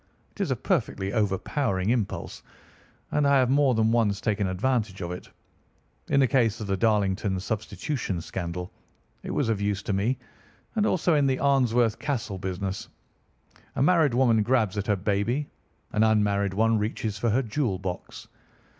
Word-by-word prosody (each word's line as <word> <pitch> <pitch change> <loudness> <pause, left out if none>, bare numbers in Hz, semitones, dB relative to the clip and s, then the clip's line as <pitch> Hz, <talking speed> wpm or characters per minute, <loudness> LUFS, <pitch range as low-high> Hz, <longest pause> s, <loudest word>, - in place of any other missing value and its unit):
It - - -7
is - - 0
a - - +1
perfectly 95 +1 -1
overpowering 105 0 0
impulse, 115 -5 -2 0.7
and 150 -1 +2
I 140 0 +5
have 130 -1 +3
more 140 -2 +4
than 110 0 +2
once 110 -4 +2
taken 105 -3 0
advantage 105 +1 -1
of 85 0 -4
it. 90 - -8 0.8
In 140 - +3
the 135 - +5
case 115 -4 +2
of 110 - -4
the 100 -1 0
Darlington 100 -2 +1
Substitution 110 - -3
Scandal 90 +1 -5 0.5
it - - -8
was 140 - 0
of 110 -3 0
use 100 -1 -1
to 105 - -2
me, 110 +7 +1 0.6
and 215 -1 +2
also 175 -1 +2
in 145 -2 +3
the 130 -1 +1
Arnsworth 125 -5 +2
Castle 115 -9 -3
business. 95 +1 -4 0.9
A - - +1
married 155 -5 +4
woman 120 -4 +4
grabs 110 -4 +1
at 100 -1 -3
her 105 - +3
baby; 105 +8 -1 0.4
an 105 - +1
unmarried 100 -3 +2
one 110 +1 +3
reaches 105 -1 -3
for 115 - +1
her 125 +5 +2
jewel 115 -3 -1
box. 90 -1 -6
110 Hz, 165 wpm, -26 LUFS, 100-130 Hz, 0.9 s, I